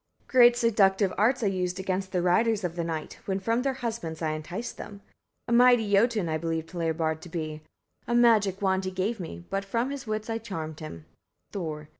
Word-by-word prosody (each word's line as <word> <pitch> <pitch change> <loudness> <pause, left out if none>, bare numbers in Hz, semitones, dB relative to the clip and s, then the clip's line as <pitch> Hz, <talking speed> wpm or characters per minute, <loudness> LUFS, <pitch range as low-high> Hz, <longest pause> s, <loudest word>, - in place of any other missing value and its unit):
Great 240 -1 +6
seductive 200 -5 +3
arts 235 +4 +2
I - - +2
used 185 -2 -1
against 190 0 -2
the 180 -2 0
riders 215 +4 +2
of 175 -1 -3
the 170 - -2
night, 160 -2 -5
when 190 -1 -1
from 230 +5 0
their 270 0 -1
husbands 170 -9 -4
I 160 -2 -1
enticed 170 +9 -5
them. 200 -1 -9 0.4
A - - -4
mighty 240 -3 +5
Jotun 210 -2 +3
I 155 -1 -1
believed 165 -1 -3
Hlebard 160 -2 -1
to 175 - -10
be: 155 -2 -4 0.5
a 240 - 0
magic 210 -5 +4
wand 190 0 +1
he - - -1
gave 190 +5 -2
me, 85 - -7
but 195 0 -1
from 230 +6 -1
his 280 -4 -6
wits 215 0 -3
I 225 0 -2
charmed 160 -8 -6
him. 85 - -8 0.5
Thor. 155 -5 -5
190 Hz, 200 wpm, -27 LUFS, 165-225 Hz, 0.5 s, Great